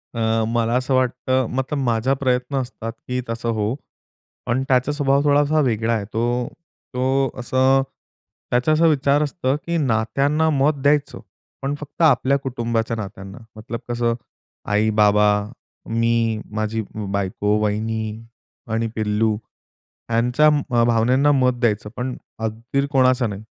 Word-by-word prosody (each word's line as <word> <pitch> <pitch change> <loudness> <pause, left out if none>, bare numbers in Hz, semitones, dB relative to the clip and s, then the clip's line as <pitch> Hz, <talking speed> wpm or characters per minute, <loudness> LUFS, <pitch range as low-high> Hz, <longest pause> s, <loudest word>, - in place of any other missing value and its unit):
अ, 115 0 +1
मला 115 0 0
असं 130 +1 -1
वाटतं 130 0 +1
मतलब 130 +3 -1
माझा 120 +2 +1
प्रयत्न 130 0 -1
असतात 115 -2 -6 0.2
की 125 0 -1
तसं 115 0 -3
होवो, 110 +1 -1 0.7
पण 125 +2 0
त्याचा 130 +1 +2
स्वभाव 140 -1 +2
थोडासा 145 +1 +3
वेगळा 115 -3 +1
आहे. 105 -3 -1
तो 120 +3 -1 0.5
तो 130 +1 +1
असं 130 +2 +3 0.7
त्याचा 125 +5 +2
असा 160 +2 +4
विचार 145 0 +3
असतो 145 -3 -1
की 170 0 -1
नात्यांना 140 +4 +1
मत 145 +1 +3
द्यायचं 145 +1 +1 0.4
पण 140 +1 -1
फक्त 150 +3 -9
आपल्या 140 -3 +4
कुटुंबाच्या 115 -3 -2
नात्यांना, 95 -1 -8 0.2
मतलब 115 +1 -6
कसं 120 -1 0 0.6
आई, 105 +1 +3
बाबा, 105 -1 +4 0.6
मी, 115 -1 +1
माझी 110 +1 -1
ब् 100 -1 -7
बायको, 100 +1 0
वहिनी 110 +1 -2 0.5
आणि 115 0 0
पिल्लू 110 0 +1 0.7
ह्यांच्या 120 +6 +2
अ, 135 -6 +2
भावनांना 125 +5 +3
मत 125 -2 +2
द्यायचं, 105 -3 0
पण 125 +1 -3 0.2
अगदी 115 +5 -2
र 140 - -1
कोणाचा 130 -2 +3
नाही 105 -1 -5
120 Hz, 135 wpm, -21 LUFS, 110-135 Hz, 0.7 s, असा